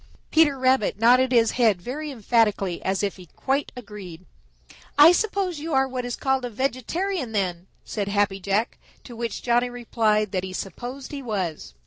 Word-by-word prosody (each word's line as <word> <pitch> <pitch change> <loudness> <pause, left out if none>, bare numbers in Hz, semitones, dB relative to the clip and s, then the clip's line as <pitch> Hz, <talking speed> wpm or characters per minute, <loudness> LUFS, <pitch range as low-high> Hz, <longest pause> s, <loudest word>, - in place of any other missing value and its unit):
Peter 315 -4 +4
Rabbit 260 -6 +2
nodded 250 +3 +4
his 230 -3 +4
head 225 -7 +2
very 285 +11 -5
emphatically 215 -7 +1
as 190 +2 -1
if 200 -1 -2
he 180 -1 -13
quite 270 - -2
agreed. 200 -7 -10 0.7
"I 300 +3 +9
suppose 380 -3 0
you 310 -1 -3
are 265 0 +3
what 255 -1 -4
is 245 - -3
called 265 -1 0
a 245 - -3
vegetarian, 265 - -2
then," 180 -3 -2 0.2
said 205 -3 -3
Happy 200 -1 +1
Jack, 200 +4 -1 0.2
to 240 - -10
which 230 -1 -4
Johnny 240 0 +2
Chuck 245 - -9
replied 215 -3 +1
that 185 -2 -1
he 190 -1 -6
supposed 245 +9 -6
he 285 -1 -5
was. 185 - -4
235 Hz, 175 wpm, -24 LUFS, 200-265 Hz, 0.7 s, I